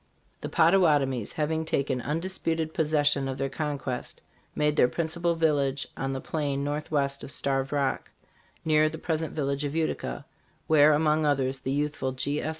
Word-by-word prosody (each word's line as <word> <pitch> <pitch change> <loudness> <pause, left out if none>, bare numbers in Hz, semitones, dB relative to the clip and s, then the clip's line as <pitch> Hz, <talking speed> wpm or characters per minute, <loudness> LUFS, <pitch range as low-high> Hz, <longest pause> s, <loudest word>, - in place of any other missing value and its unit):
The - - -4
Pottawatomies 150 - +3
having 160 +1 -1
taken 140 -5 -1
undisputed 165 +1 -2
possession 145 -3 +2
of 135 0 -4
their 135 0 -2
con 150 -2 -2
quest, 130 -2 -5 0.4
made 150 0 +1
their 125 - +5
principal 170 +3 -1
village 145 -4 +1
on 135 0 -3
the 135 - -3
plain 140 -2 -2
northwest 145 -1 -1
of - - -7
Starved 135 -1 0
Rock, 140 -2 -1 0.6
near 155 -1 +4
the 160 - -7
present 160 0 -2
village 140 -1 -1
of 145 +1 -3
Utica, 160 -1 -2 0.4
where, 155 -1 +6
among 155 +1 +2
others, 135 -2 0
the 130 - -3
youthful 145 -2 -1
G. 145 +3 -1
S. 155 - -2
150 Hz, 160 wpm, -27 LUFS, 140-160 Hz, 0.6 s, where